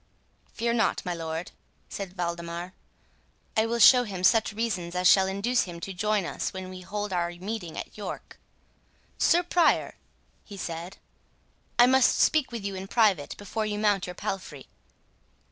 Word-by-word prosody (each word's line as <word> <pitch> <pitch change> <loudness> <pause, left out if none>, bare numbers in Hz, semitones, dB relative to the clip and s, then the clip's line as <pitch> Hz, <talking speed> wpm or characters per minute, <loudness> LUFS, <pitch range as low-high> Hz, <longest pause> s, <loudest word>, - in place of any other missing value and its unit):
"Fear 235 +1 -1
not, 225 -3 +1
my 180 - -1
lord," 165 0 -5 0.4
said 195 -2 -7
Waldemar; 170 +1 -4 0.8
"I 220 +1 +3
will 235 +1 -1
show 245 +3 +8
him 190 -5 -6
such 225 +2 +4
reasons 200 -6 -3
as 180 0 +3
shall 190 +1 +6
induce 205 +6 0
him 175 -2 -8
to 195 +3 -6
join 210 +1 0
us - - -3
when 185 0 -7
we 185 0 -9
hold 205 +2 -4
our 175 -1 0
meeting 180 -1 -6
at - - -7
York.—Sir 330 - -3
Prior," 345 -2 +2 0.5
he 200 - -11
said, 170 +1 -6 0.8
"I 245 - +8
must 260 0 +4
speak 310 -5 +3
with 230 -4 -6
you 200 - -2
in 190 0 -6
private, 195 -10 +2
before 215 +2 -3
you 210 -1 -2
mount 205 -3 +1
your 180 - -7
palfrey." 170 -10 -5
195 Hz, 160 wpm, -27 LUFS, 180-220 Hz, 0.8 s, show